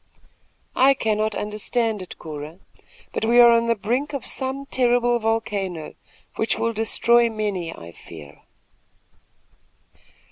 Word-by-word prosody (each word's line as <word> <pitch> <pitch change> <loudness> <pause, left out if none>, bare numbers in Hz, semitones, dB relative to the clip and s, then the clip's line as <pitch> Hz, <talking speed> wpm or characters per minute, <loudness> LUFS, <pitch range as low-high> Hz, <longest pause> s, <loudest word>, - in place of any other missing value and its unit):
I 270 +2 +5
cannot 215 -3 -1
understand 215 +1 -2
it, 185 - -10
Cora; 155 +1 -8 0.6
but - - -2
we 235 +2 +4
are 240 -1 +9
on 230 0 +3
the 230 - +2
brink 245 +8 -2
of 275 - -4
some 265 +1 -4
terrible 245 -2 +2
volcano, 205 -7 -2 0.4
which 220 - 0
will 230 0 -1
destroy 235 +2 +3
many, 205 -6 -3
I 85 - -11
fear." 75 -3 -13
225 Hz, 120 wpm, -23 LUFS, 200-240 Hz, 0.6 s, are